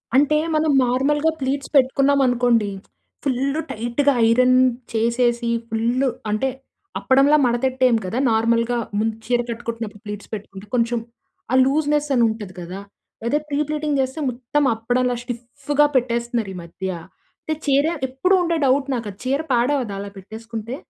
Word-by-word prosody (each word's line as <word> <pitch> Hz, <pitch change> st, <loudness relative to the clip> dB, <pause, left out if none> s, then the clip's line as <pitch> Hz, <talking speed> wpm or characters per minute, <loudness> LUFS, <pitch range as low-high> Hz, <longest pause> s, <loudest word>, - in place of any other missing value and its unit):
అంటే, 295 Hz, +2 st, +4 dB, 0.2 s
మనం 310 Hz, -1 st, +2 dB
నార్మల్‌గా 290 Hz, +5 st, +1 dB
ప్లీట్స్ 270 Hz, +1 st, -2 dB
పెట్టుకున్నాం 275 Hz, +1 st, +4 dB
అనుకోండి, 240 Hz, -3 st, +2 dB, 0.5 s
ఫుల్ 275 Hz, +2 st, 0 dB
టైట్‌గా 240 Hz, +6 st, +1 dB
ఐరన్ 250 Hz, +2 st, +4 dB, 0.4 s
చేసేసి 235 Hz, +1 st, +1 dB, 0.2 s
ఫుల్ 230 Hz, +4 st, 0 dB, 0.3 s
అంటే, 215 Hz, +6 st, 0 dB, 0.5 s
అప్పడంలా 275 Hz, +3 st, +4 dB
మడతెట్టేయం 255 Hz, 0 st, +2 dB
కదా! 190 Hz, +7 st, -3 dB
నార్మల్‌గా 230 Hz, +2 st, +2 dB, 0.2 s
ముందు 225 Hz, 0 st, 0 dB
చీర 245 Hz, 0 st, +1 dB
కట్టుకుంటున్నప్పుడు 230 Hz, -2 st, -5 dB
ప్లీట్స్ 210 Hz, +1 st, -7 dB
పెట్టుకుంటే, 200 Hz, -1 st, -8 dB
కొంచెం 235 Hz, 0 st, +1 dB, 0.5 s
ఆ -, -, +4 dB
లూజ్‌నెస్ 295 Hz, +1 st, +1 dB
అని 240 Hz, -, +4 dB
ఉంటది 210 Hz, -4 st, -6 dB
కదా! 180 Hz, +3 st, -7 dB, 0.5 s
అదే 290 Hz, +5 st, +2 dB
ప్రీ 290 Hz, 0 st, -1 dB
ప్లీటింగ్ 300 Hz, -2 st, -1 dB
చేస్తే 260 Hz, +4 st, -3 dB
మొత్తం 255 Hz, +4 st, -1 dB
అప్పడంలా 245 Hz, +2 st, 0 dB
స్టిఫ్‌గా 270 Hz, +4 st, -1 dB
పెట్టేస్తున్నారు 235 Hz, -4 st, 0 dB
ఈ -, -, -7 dB
మధ్య. 190 Hz, +3 st, -6 dB, 0.5 s
అంటే, 315 Hz, -, -2 dB
చీర 280 Hz, +1 st, +4 dB, 0.2 s
ఎప్పుడూ 365 Hz, +9 st, +2 dB
ఉండే 335 Hz, -1 st, 0 dB
డౌట్ 270 Hz, +1 st, +2 dB
నాకు, 230 Hz, -3 st, -4 dB
అది 195 Hz, -, -19 dB
చీర 275 Hz, +3 st, +1 dB
పాడవ్వదా 245 Hz, -3 st, +1 dB
అలా 200 Hz, -, -7 dB
పెట్టేసుకుంటే? 225 Hz, +4 st, -7 dB
245 Hz, 140 wpm, -21 LUFS, 230-275 Hz, 0.5 s, అంటే